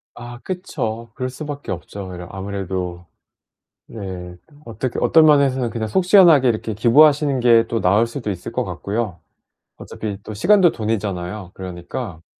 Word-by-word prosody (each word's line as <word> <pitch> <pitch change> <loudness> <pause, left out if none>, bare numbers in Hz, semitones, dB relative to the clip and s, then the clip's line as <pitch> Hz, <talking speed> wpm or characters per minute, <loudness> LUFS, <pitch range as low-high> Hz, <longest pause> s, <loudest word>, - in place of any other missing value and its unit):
아 120 0 -9
그쵸. 115 - -4
그럴 130 -1 -3
수 140 +4 -8
밖에 145 -7 -6
없죠. 95 +1 -7
이러 90 -1 -8
아무래도 95 -2 -5 0.8
네. 90 -4 -7 0.3
어떻 115 +2 -4
어떤 160 -1 +5
면에서는 135 -5 +3
그냥 110 -1 -3
속 185 - 0
시원하게 170 -10 +6
이렇게 110 0 -2
기부하시는 140 +5 +4
게 115 -1 +5
또 115 - -1
나을 105 +5 +3
수도 115 -2 -5
있을 90 -2 -7
것 - - -1
같고요. 100 -4 -4 0.6
어차피 105 -3 -6
또 110 - -8
시간도 185 - +4
돈이잖아요. 100 -4 -4
그러니까 90 0 -7
115 Hz, 330 characters per minute, -20 LUFS, 95-130 Hz, 0.8 s, 시원하게